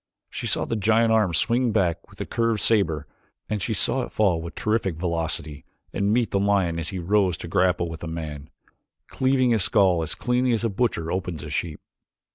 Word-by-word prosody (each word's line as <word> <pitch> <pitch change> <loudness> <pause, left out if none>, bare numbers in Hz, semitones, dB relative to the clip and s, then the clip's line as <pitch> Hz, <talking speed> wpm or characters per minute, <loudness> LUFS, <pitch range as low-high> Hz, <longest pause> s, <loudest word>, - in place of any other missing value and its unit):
She - - -4
saw - - 0
the - - -2
giant 110 +2 +3
arm 110 -5 +3
swing 120 +6 +1
back 90 -6 0
with - - -17
the - - -4
curved 115 -2 0
saber 80 -11 +1 0.4
and 105 -1 -2
she 110 +3 -1
saw 85 - +1
it - - -6
fall 95 -6 +1
with 85 +1 -8
terrific 110 -6 0
velocity 80 -3 -2 0.3
and 100 +1 0
meet 115 -1 +1
the 100 - +1
lion 95 -4 +1
as 80 - -3
he 95 - -5
rose 90 0 +1
to - - -7
grapple 90 0 +1
with 80 -1 -7
the 85 - -6
man, 75 -3 -6 0.6
cleaving 130 -1 +2
his 110 -4 +3
skull 95 -5 +3
as 80 - -1
cleanly 125 0 +1
as 115 - 0
a 115 - +1
butcher 95 -6 -1
opens 90 -5 -3
up 75 - -7
a - - -8
sheep. 75 +1 -3
95 Hz, 210 wpm, -24 LUFS, 85-110 Hz, 0.6 s, giant